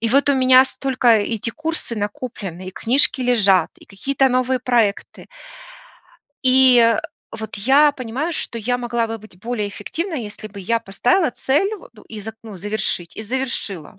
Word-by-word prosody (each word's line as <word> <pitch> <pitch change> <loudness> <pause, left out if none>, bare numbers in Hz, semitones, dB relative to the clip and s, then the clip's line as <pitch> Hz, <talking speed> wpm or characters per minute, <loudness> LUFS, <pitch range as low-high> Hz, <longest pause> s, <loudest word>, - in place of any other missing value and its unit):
И 230 - 0
вот 275 +4 +3
у 280 - +3
меня 260 0 +6
столько 265 -2 -1
эти 225 0 +2
курсы 315 -2 -5
накоплены, 205 -4 -5
и - - -6
книжки 260 +6 +1
лежат, 210 -7 +3
и - - -17
какие-то 270 +6 0
новые 255 +1 +1
проекты 230 -5 0 1.2
и 255 -3 +5 0.4
вот 220 -1 -6
я 280 +8 +4
понимаю, 260 +6 -4
что 235 - -3
я 245 +3 -1
могла 235 -1 -1
бы 225 0 -5
быть 210 -4 -16
более 220 -1 -3
эффективной, 320 - -4
если 215 0 -9
бы 200 -1 -10
я 230 +5 0
поставила 300 - +1
цель 300 - 0
вот 345 - -16 0.2
и 220 -2 -8
за 220 +2 -7
ну, 215 -4 -9
завершить 195 -3 -3
и - - -5
завершила. 215 - -4
235 Hz, 165 wpm, -20 LUFS, 210-260 Hz, 1.2 s, меня